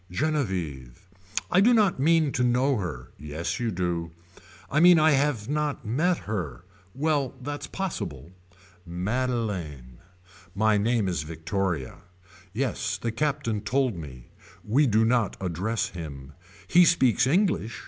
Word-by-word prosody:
Genevieve. 90 - -3 0.4
I 185 - +5
do 240 +4 +5
not 205 -9 +3
mean 160 0 +3
to 125 - 0
know 125 +2 +2
her. 75 -11 -5
Yes 75 - -4
you 120 -1 -1
do. 85 -3 -2 0.6
I 150 - +1
mean 175 +1 +7
I 155 0 +5
have 135 -6 +1
not 150 -3 -2
met 165 +11 +1
her. 90 - -4 0.3
Well 145 -3 0
that's 145 +3 -5
possible. 85 - -5 0.5
Madeleine. 90 - -3 0.6
My 110 +1 +3
name 110 -1 +1
is 85 -5 -1
Victoria. 80 -1 -3 0.5
Yes 110 -3 -2
the 115 +3 -3
Captain 135 -4 -1
told 125 +1 0
me. 65 -7 -10 0.4
We 135 +7 +3
do 110 0 +3
not 115 -3 +1
address 95 +5 -2
him. 70 -5 -8 0.3
He 180 +1 +6
speaks 130 -7 +3
English. 170 - +1
110 Hz, 130 wpm, -26 LUFS, 85-145 Hz, 0.6 s, mean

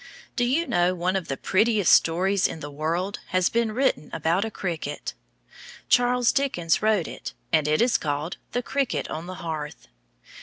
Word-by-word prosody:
Do 245 - +1
you 285 +8 +1
know 175 - +2
one 180 +2 0
of 190 -3 -2
the 135 - -3
prettiest 205 - +2
stories 185 +4 +3
in - - -7
the 145 -1 -7
world 165 +7 -2
has 185 0 +2
been 230 -1 0
written 255 - 0
about 165 +4 +1
a 225 - -2
cricket? 165 -8 -4 0.8
Charles 245 0 +4
Dickens 255 - +1
wrote 215 -5 +2
it, - - -8 0.2
and 155 -2 +3
it 155 +7 +3
is 245 - +2
called 150 +3 -3 0.2
"The 245 - -1
Cricket 275 -1 -1
on 160 +3 -5
the 185 - -6
Hearth." 155 -2 -5
185 Hz, 175 wpm, -25 LUFS, 160-230 Hz, 0.8 s, Charles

